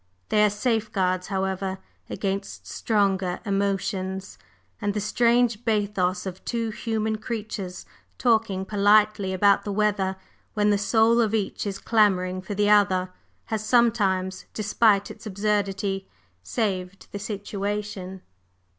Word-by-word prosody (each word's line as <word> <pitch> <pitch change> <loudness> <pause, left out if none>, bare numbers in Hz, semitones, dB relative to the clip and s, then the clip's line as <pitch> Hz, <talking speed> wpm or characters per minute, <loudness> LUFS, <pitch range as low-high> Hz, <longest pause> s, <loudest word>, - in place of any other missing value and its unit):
They 210 0 +4
are 210 - +5
safeguards, 210 -4 0
however, 190 -1 -2 0.3
against 195 0 -4
stronger 195 -4 0
emotions; 195 - -2 0.4
and 205 0 -1
the - - +1
strange 235 +1 +2
bathos 200 -5 0
of 190 0 -6
two 230 -2 -2
human 220 -1 -2
creatures 210 -5 -5 0.3
talking 220 -5 +1
politely 205 -1 +3
about 200 +1 +4
the 205 - -4
weather 200 -2 +1 0.4
when 210 0 +3
the 205 - +2
soul 225 +3 +4
of 220 -1 +1
each 205 0 -2
is 195 -1 -3
clamoring 185 -5 +2
for 200 +2 -5
the 205 +1 +2
other, 190 -3 +3 0.4
has 215 -1 -1
sometimes, 210 -5 +2
despite 210 -1 +2
its - - -10
absurdity, 200 -1 -1 0.3
saved 185 - -3
the 200 - -5
situation. 200 -2 -4
205 Hz, 120 wpm, -25 LUFS, 190-215 Hz, 0.4 s, are